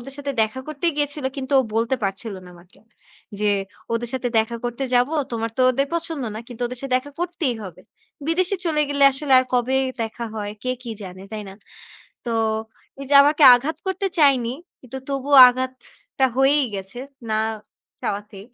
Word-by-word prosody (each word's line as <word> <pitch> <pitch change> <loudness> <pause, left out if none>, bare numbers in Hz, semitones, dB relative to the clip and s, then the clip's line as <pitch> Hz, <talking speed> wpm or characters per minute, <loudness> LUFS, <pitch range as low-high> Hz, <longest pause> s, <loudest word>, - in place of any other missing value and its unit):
ওদের 270 +3 -9
সাথে 285 0 -3
দেখা 220 +4 -2
করতেই 310 +3 -1
গিয়েছিল, 290 -1 -2
কিন্তু 265 0 -5
ও - - 0
বলতে 230 +3 +1
পারছিল 195 +2 -4
না - - -12
আমাকে। 175 +1 -20 0.6
যে, 210 0 +2 0.4
"ওদের 230 0 -2
সাথে 255 -1 -1
দেখা 225 +2 0
করতে 240 +3 -3
যাব। 245 +1 +4 0.2
তোমার 230 0 -2
তো - - +4
ওদের 275 +2 0
পছন্দ 330 -3 -3
না। 215 - -5
কিন্তু 245 -1 -7
ওদের 250 +1 -6
সাথে 275 -2 -4
দেখা 275 +3 -5
করতেই 345 -8 -1
হবে। 190 -4 -10 0.5
বিদেশে 365 +4 +1
চলে 305 -2 +2
গেলে 280 -1 +3
আসলে 270 +1 -2
আর 255 - +2
কবে 250 +2 +1 0.3
দেখা 225 +1 -5
হয়, 205 -1 -4
কে 255 - -1
কি 240 - -6
জানে," 185 -1 -9
তাই 215 -1 -4
না? - - -11 0.7
তো 235 - -1 0.7
এইযে 275 +1 -1
আমাকে 295 +2 +2
আঘাত 280 +6 -1
করতে 380 +1 -1
চায়নি। 260 -5 +3 0.3
কিন্তু 260 +1 -8
তবুও 275 +1 +1
আঘাতটা 260 +1 -3
হয়েই 275 +2 +4
গেছে, 195 +5 -7 0.3
না 215 - +1 0.6
চাওয়াতে। 205 -1 -4
255 Hz, 175 wpm, -22 LUFS, 230-285 Hz, 0.7 s, যাব